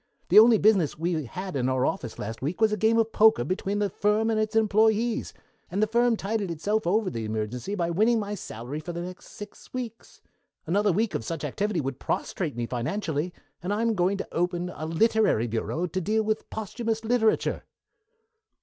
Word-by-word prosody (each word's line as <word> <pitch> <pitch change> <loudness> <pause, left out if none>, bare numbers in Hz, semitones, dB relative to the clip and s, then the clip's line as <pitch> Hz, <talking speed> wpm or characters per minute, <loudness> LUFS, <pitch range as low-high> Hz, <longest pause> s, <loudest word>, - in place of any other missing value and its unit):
The - - +9
only 225 0 +7
business 200 -9 +3
we 165 -2 -1
had 185 +7 -6
in 130 -1 +1
our 130 0 +1
office 160 - -3
last 110 +2 -6
week 150 +6 -3
was 220 -1 +4
a - - +1
game 220 +2 +2
of 225 0 +2
poker 220 - +5
between 190 - -2
the 205 0 +1
firm 210 +4 +1
and 220 - +1
its 215 0 -1
employés, 220 +1 +2 0.4
and 190 - -2
the 215 - +4
firm 235 +1 +2
tided 205 -1 -2
itself 205 +6 -1
over 205 +2 +1
the 115 -2 -4
emergency 110 - -3
by 170 -3 -1
winning 220 +6 +3
my 205 -1 -3
salary 130 - -6
for 170 +3 -6
the 170 - -4
next 180 +1 -9
six 205 0 -11
weeks. 235 -3 -7 0.5
Another 200 +5 +2
week 210 +4 0
of - - -2
such 160 +4 -5
activity 195 +6 -1
would 135 -1 -4
prostrate 160 -9 -2
me 120 0 -2
financially, 155 - -2 0.3
and 180 +3 -3
I 210 +2 0
am 230 -1 +2
going 190 0 +1
to - - -5
open 175 +1 -1
a 155 - -5
literary 210 - +2
bureau 120 +9 -2
to 185 +2 -3
deal 215 +4 0
in 215 - +3
posthumous 225 +1 -3
literature." 225 -1 +1
195 Hz, 195 wpm, -26 LUFS, 160-220 Hz, 0.5 s, The